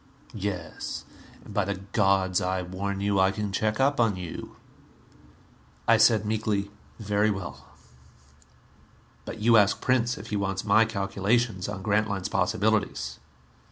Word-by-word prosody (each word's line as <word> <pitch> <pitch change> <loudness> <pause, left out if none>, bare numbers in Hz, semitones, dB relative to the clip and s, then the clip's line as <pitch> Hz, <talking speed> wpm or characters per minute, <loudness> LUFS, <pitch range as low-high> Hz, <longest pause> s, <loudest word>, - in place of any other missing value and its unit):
"Yes. 100 -6 -5 0.4
And 105 - -10
by 100 - +2
the 100 +1 -2
gods, 95 -1 +1
I 90 0 -1
warn 95 +2 -4
you, 100 -1 +1
I 95 0 +5
can 105 0 -3
check 110 +4 0
up 140 +1 +2
on 115 -4 +3
you!" 90 -3 -7 1.3
I 115 - +6
said 110 -1 +4
meekly, 105 -2 -1 0.3
"Very 105 0 +1
well. 85 -10 -5 1.6
But 110 - -7
you 115 +1 +6
ask 105 -1 +4
Prince 125 -1 +1
if 110 +2 -9
he - - 0
wants 95 -1 -2
my 110 +2 +5
calculations 100 0 0
on 95 - -6
Grantline's 105 -2 0
possibilities." 110 0 0
100 Hz, 135 wpm, -27 LUFS, 95-110 Hz, 1.6 s, I